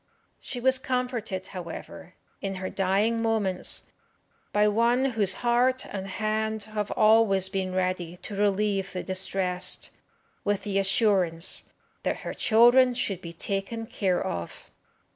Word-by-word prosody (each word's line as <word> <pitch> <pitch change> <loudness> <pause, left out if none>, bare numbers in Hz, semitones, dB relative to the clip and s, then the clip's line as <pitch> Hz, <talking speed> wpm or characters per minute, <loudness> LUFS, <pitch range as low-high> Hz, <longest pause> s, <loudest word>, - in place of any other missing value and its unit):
She 250 - -6
was 260 +1 +2
comforted, 245 -7 -2
however, 175 -3 -9 0.3
in 195 -1 -3
her 185 0 -5
dying 205 +4 +1
moments, 215 -5 0 0.6
by 210 0 +3
one 235 +5 +2
whose 200 -5 +1
heart 250 +2 +2
and 195 -1 -6
hand 220 +1 -2
have 210 -1 -4
always 215 -3 +4
been 190 -1 -2
ready 180 -2 -1
to 205 - -7
relieve 200 -1 0
the 180 - -4
distressed, 185 -1 0 0.5
with 205 -1 0
the 195 -2 0
assurance 190 -4 +2 0.3
that - - -2
her - - -5
children 240 +3 +5
should 195 -6 -2
be 170 - -7
taken 195 +6 -3
care 190 -5 -1
of. 85 -1 -6
200 Hz, 130 wpm, -27 LUFS, 190-225 Hz, 0.6 s, children